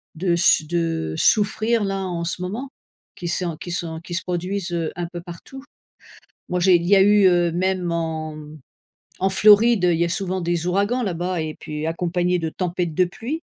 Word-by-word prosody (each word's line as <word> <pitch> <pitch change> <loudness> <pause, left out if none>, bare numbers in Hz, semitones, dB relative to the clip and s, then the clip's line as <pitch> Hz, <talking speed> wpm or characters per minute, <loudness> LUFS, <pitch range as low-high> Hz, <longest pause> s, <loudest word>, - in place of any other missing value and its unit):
de 175 +1 0
s 170 -2 +4
de 165 - -1
souffrir, 220 - +2
là, 195 -1 -2
en 170 -1 -3
ce 170 +1 -3
moment, 220 +9 -4 0.5
qui 175 - -6
sont 170 -1 -2
qui 175 - -7
sont 165 -2 -4
qui 175 - -9
se 185 - -2
produisent, 180 +1 -3
heu, 165 -2 -2
un 175 -1 -3
peu 175 - -6
partout. 175 +10 -11 0.9
Moi, 180 0 -1
j'ai 185 0 +5
il 170 0 -2
y 200 +1 +5
a 190 - +6
eu, 205 0 +5
heu, 175 -1 +2
même 180 0 -1
en 160 -2 -3 0.8
en 190 - +2
Floride, 210 0 +5
il 170 -2 +3
y 170 - +3
a 170 - -2
souvent 185 +1 -2
des 170 0 -1
ouragans 200 +7 +1
là-bas 180 -2 -2
et 155 -1 -4
puis 150 +1 -5
accompagnés 180 +1 0
de 160 -1 -2
tempêtes 175 -1 -3
de 185 - +4
pluie. 240 - -5
175 Hz, 195 wpm, -22 LUFS, 170-195 Hz, 0.9 s, a